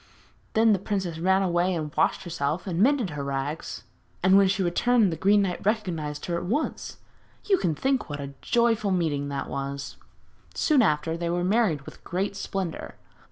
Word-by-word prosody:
Then 220 0 +5
the 195 - +1
princess 190 -4 -3
ran 190 +3 +3
away 180 0 +1
and 155 -2 -4
washed - - +1
herself 165 -1 -2
and 180 -2 -1
mended 250 - +3
her 145 -1 -4
rags, 140 +3 -4 0.4
and 190 +1 +5
when 195 0 +6
she 190 0 +1
returned 210 +4 +3
the - - -2
Green 200 +4 +3
Knight 180 -2 -3
recognised 170 -9 -2
her 170 -1 -1
at - - -4
once. 265 - -2 0.5
You 390 -3 +4
can 165 -4 0
think 265 - 0
what 145 0 -5
a 140 0 -6
joyful 230 -3 +2
meeting 155 -6 0
that 140 -1 -3
was! 140 0 -5 0.6
Soon 300 -5 +3
after, 160 -4 +1
they 170 0 -2
were 175 +1 0
married 190 -6 +2
with - - -13
great 190 +3 -2
splendour. 195 -3 -4
180 Hz, 180 wpm, -26 LUFS, 155-205 Hz, 0.6 s, when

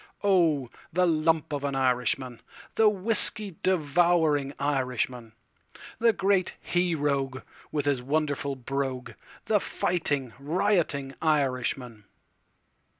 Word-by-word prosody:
Oh, 165 -9 +3 0.2
the 180 +2 +2
lump 160 -2 +1
of 145 -1 -3
an 140 -1 -1
Irishman, 125 -1 0 0.3
The 220 -1 +5
whiskey 210 -2 -1
devouring 160 -4 +2
Irishman, 125 -4 -2 0.7
The 230 0 +5
great 195 -3 +1
he 175 -1 0
rogue 140 -3 -1 0.3
with 145 -2 -1
his 140 -3 +1
wonderful 145 0 -1
brogue—the 135 - -3
fighting, 145 - -1
rioting 150 -3 0
Irishman. 130 -7 0
145 Hz, 95 wpm, -27 LUFS, 135-175 Hz, 0.7 s, The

